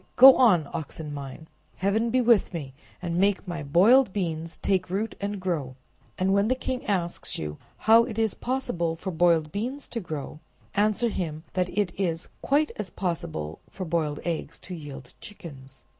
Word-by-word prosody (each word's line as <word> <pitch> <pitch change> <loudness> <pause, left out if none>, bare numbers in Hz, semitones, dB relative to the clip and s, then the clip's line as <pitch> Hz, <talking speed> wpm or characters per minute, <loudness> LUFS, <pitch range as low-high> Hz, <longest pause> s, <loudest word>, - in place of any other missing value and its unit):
go 265 +1 +10
on, 180 - +5
oxen 155 -2 -5
mine! 140 +2 -8 0.3
Heaven 215 +5 +1
be 255 +2 +3
with 230 -7 +3
me, 140 -5 -5 0.3
and 170 -1 -2
make 200 0 +2
my 170 -3 -4
boiled 195 - +5
beans 165 -4 -3
take 185 -2 0
root 205 +5 -1
and 200 0 -2
grow!' 160 -9 -2 0.4
And 190 +1 +2
when 200 +1 +3
the 255 - +2
king 255 0 -3
asks 180 -4 -2
you 75 -1 -5 0.2
how 225 +1 +6
it 230 -3 -6
is 220 -2 +1
possible 240 -11 -2
for 185 +3 -5
boiled 165 -2 +3
beans 250 - -4
to 235 - -3
grow, 155 -5 -6 0.3
answer 215 +3 +2
him, 160 -6 -4
that 180 -1 0
it 200 -4 +1
is 165 -3 -2
quite 295 +2 +2
as 210 -3 -4
possible 80 - -4
as - - -26
for 185 - -3
boiled 160 -3 -1
eggs 165 -2 -3
to 185 - -8
yield 140 -6 -8
chickens." 135 -9 -11
180 Hz, 175 wpm, -26 LUFS, 160-210 Hz, 0.4 s, go